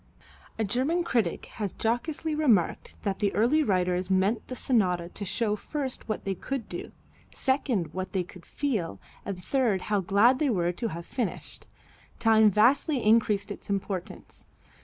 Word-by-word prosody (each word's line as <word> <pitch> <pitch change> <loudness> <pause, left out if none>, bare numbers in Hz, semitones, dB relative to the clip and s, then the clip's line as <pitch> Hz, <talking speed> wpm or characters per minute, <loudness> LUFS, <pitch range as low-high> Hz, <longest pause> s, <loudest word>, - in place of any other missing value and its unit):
A 220 - 0
German 265 - +1
critic 230 - 0 0.2
has 200 -3 -1
jocosely 290 +7 -1
remarked 250 - +1
that 200 -2 -1
the 200 -1 +1
early 245 +9 +3
writers 180 -6 +1
meant 190 +4 +1
the 255 - -5
sonata 180 -10 +1
to 200 - -6
show 210 +2 0
first 265 +2 -4
what 215 - -3
they 195 - 0
could 255 +5 -4
do, - - -6 0.4
second 260 - 0
what 185 0 -4
they 190 -2 0
could 180 0 -14
feel, 205 - -2 0.3
and 185 -3 -5
third 230 -4 +1
how 205 - +4
glad 205 +7 +4
they 300 -3 +2
were 175 -6 +1
to 205 +6 -3
have 170 -4 -6
finished. 235 -2 -4 0.5
Time 220 -1 +5
vastly 250 - +3
increased 215 -2 +3
its 205 - -8
importance. 195 -2 -4
210 Hz, 160 wpm, -28 LUFS, 185-255 Hz, 0.5 s, Time